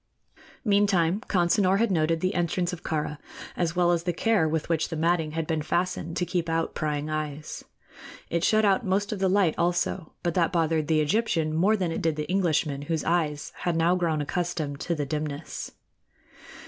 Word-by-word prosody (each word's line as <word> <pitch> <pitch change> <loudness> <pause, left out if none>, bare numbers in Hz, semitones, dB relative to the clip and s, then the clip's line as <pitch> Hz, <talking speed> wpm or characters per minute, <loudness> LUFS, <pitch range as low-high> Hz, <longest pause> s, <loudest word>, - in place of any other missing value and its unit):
Meantime 200 -3 +3
Consinor 185 +1 +3
had 230 0 +2
noted 165 -1 +1
the 185 +2 0
entrance 175 0 0
of 175 - -6
Kāra, 150 -1 -3 0.4
as 170 -1 -1
well 175 -1 +3
as 170 -1 +1
the 175 +1 -1
care 205 -3 +2
with 160 0 -1
which 165 -2 0
the - - -4
matting 160 -1 +1
had 165 0 -2
been 160 -1 -1
fastened 170 +1 -2
to 180 - 0
keep 175 -1 -2
out 165 0 -1
prying 150 -1 -2
eyes. 155 -1 -4 0.6
It 170 0 -1
shut 215 +2 +4
out 200 +4 +3
most 200 0 0
of 210 - -3
the 190 -1 +2
light, 190 -4 +3
also; 175 -1 0
but 175 -2 0
that 170 -1 +2
bothered 160 -3 +1
the 155 -1 +3
Egyptian 160 -2 +1
more 195 +7 +3
than 180 -4 -1
it - - -3
did 160 -2 +1
the 150 0 -4
Englishman, 160 -6 0
whose 160 +2 -2
eyes 155 -3 0
had 175 -2 -1
now 165 +2 +3
grown 165 -4 0
accustomed 155 -2 -2
to 170 - -2
the 150 -2 -2
dimness. 150 +1 -4
170 Hz, 190 wpm, -26 LUFS, 155-180 Hz, 0.6 s, shut